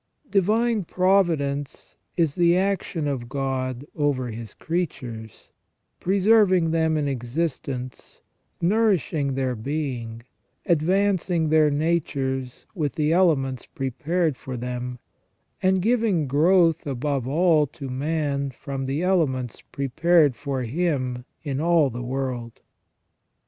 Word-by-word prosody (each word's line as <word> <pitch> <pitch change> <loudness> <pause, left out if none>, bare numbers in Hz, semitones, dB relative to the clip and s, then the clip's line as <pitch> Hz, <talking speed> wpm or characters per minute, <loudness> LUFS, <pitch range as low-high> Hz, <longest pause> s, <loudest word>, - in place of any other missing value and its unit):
Divine 215 +3 +2
Providence 165 -7 0 0.2
is 165 -5 +2
the 175 +1 +3
action 185 -5 -1
of 125 -4 -3
God 130 -1 -2
over 140 -5 0
His 110 -1 -8
creatures, 125 - -5 0.5
preserving 190 -3 +4
them 160 -1 +2
in 150 -1 0
existence, 130 -1 -4 0.4
nourishing 175 -8 +1
their 130 -2 -1
being, 120 -3 -4 0.4
advancing 175 0 +2
their 155 -1 +5
natures 140 -4 -1
with 155 -8 -2
the 155 +1 +1
elements 140 -8 +2
prepared 150 +4 -1
for 130 -2 -6
them; 125 +1 -4 0.6
and 185 -1 +2
giving 220 -8 +2
growth 165 +4 +3
above 135 -1 -2
all 155 0 +3
to 135 0 -8
man 140 +1 -1
from 135 +1 -5
the 140 +5 -1
elements 135 - 0
prepared 145 +1 +2
for 135 -2 -3
him 130 -3 -1 0.2
in 140 -2 -2
all 165 -4 +3
the 120 +1 -5
world. 125 -2 -4
145 Hz, 110 wpm, -24 LUFS, 130-170 Hz, 0.6 s, their